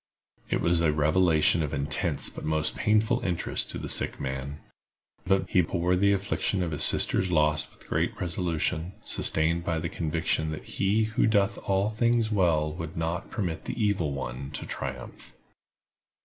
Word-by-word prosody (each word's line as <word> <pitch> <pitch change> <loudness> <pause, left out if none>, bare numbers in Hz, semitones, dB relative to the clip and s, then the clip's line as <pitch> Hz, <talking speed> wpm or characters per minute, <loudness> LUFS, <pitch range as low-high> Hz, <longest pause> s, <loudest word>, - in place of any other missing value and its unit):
It - - 0
was 85 0 +2
a 80 -2 +3
revelation 80 +2 +3
of 75 -2 -2
intense 70 +2 -1
but - - -8
most 80 -1 0
painful 110 +3 +2
interest 90 -8 -2
to - - -5
the - - -5
sick - - +3
man; 65 +2 -5 0.7
but 95 0 +2
he 90 - +3
bore 85 +1 0
the 100 +2 +3
affliction 100 -1 0
of 85 - -3
his 75 - -1
sister's 95 - +3
loss 75 -2 +2
with - - -21
great - - -1
resolution, 85 0 -1
sustained 85 +2 0
by 85 -1 -1
the 80 - -3
conviction 80 0 -1
that 75 - -7
He 105 +3 0
who 110 +1 +1
doeth 100 -3 +2
all 95 +2 +2
things 115 0 +1
well 80 -6 +2
would 80 -1 -7
not 80 +2 -3
permit 85 -6 -3
the - - -5
evil 100 -8 +1
one 70 0 -5
to - - -4
triumph. - - -7
85 Hz, 165 wpm, -27 LUFS, 80-95 Hz, 0.7 s, a